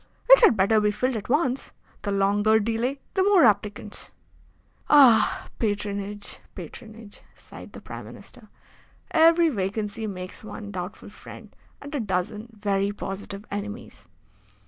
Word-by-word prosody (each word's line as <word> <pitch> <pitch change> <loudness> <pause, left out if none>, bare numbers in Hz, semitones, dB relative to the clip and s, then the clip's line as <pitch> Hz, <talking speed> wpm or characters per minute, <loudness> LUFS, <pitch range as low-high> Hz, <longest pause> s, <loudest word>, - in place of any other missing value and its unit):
"It - - +9
had 235 - +6
better 210 +3 +3
be 210 - +2
filled 250 +5 -1
at 210 0 -6
once. 270 -2 0 0.3
The 205 - -3
longer 205 +2 +3
delay 230 +5 -1 0.2
the 380 - +1
more 385 -5 +5
applicants." 210 -1 -1 0.8
"Ah, 260 -7 +5
patronage, 205 -1 -3 0.2
patronage!" 215 +4 -11
sighed - - -13
the - - -10
Prime - - -9
Minister. - - -14 0.6
"Every 330 +1 +5
vacancy 210 -1 -3
makes 185 -1 -8
one 210 -1 -8
doubtful 180 +1 -7
friend - - -13 0.2
and 285 +1 -10
a 290 - -1
dozen 210 +1 -3
very 200 -2 -1
positive 200 0 -7
enemies. 205 - -7
210 Hz, 130 wpm, -25 LUFS, 200-240 Hz, 0.8 s, It